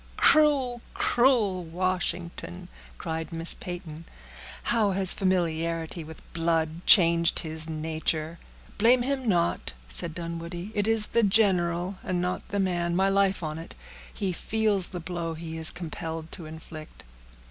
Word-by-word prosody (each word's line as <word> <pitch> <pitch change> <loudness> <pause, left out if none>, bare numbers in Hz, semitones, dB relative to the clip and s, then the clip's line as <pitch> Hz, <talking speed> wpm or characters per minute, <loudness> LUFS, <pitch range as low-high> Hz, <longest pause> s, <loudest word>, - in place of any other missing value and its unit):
"Cruel, 275 -6 +4
cruel 230 -8 +2
Washington!" 170 - -3 0.3
cried 160 - -4
Miss 165 0 0
Peyton. 170 -3 -8 0.6
"How 215 -4 +1
has 190 -1 +5
familiarity 165 -3 -1
with 160 0 -12
blood 165 0 -1
changed 170 -2 +7
his 160 0 -4
nature!" 160 +1 -2 0.4
"Blame 240 +3 +5
him 265 -1 -2
not," 170 - 0
said 160 - -2
Dunwoodie; 170 +3 -6
"it 205 0 0
is 225 -1 +2
the 235 - +1
general, 185 -3 +2
and 185 -1 -1
not 180 +1 -3
the 200 - -2
man; 175 -2 0
my 190 +2 +3
life 195 -2 +2
on 155 0 -4
it, 165 - -9 0.4
he 195 -3 -3
feels 210 -1 0
the 180 - -6
blow 170 -1 -4
he 160 0 -7
is 160 0 +3
compelled 165 -1 -6
to 170 -5 -6
inflict." 155 0 -11
175 Hz, 135 wpm, -27 LUFS, 165-195 Hz, 0.6 s, changed